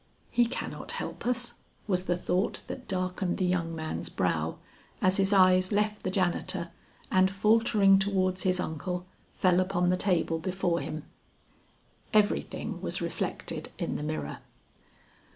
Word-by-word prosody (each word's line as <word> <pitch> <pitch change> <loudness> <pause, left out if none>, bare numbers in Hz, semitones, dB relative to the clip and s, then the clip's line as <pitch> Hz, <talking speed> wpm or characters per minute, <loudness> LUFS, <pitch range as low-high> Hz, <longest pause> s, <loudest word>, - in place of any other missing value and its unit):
"He 240 - +4
cannot 250 - -5
help - - -5
us," 245 -1 -1 0.3
was 185 -3 0
the 175 -2 +1
thought 180 +2 0
that 260 - -7
darkened 185 -1 -1
the 185 - +1
young 170 -2 0
man's 160 0 -4
brow - - -1 0.4
as 185 -1 +3
his 195 0 +3
eyes 185 -1 +5
left 210 0 +1
the - - -2
janitor, 175 -2 -1 0.4
and 185 0 +5
faltering 205 -1 +4
towards 190 -2 +1
his 185 -1 +1
uncle, 180 +2 -3 0.3
fell 180 -1 +3
upon 180 -1 +1
the 180 - +2
table 170 -4 +1
before 180 0 0
him. 155 -2 -5 1.1
Everything 210 -1 +1
was - - -3
reflected - - -4
in - - -2
the - - -3
mirror. 150 - -3
185 Hz, 140 wpm, -29 LUFS, 180-195 Hz, 1.1 s, eyes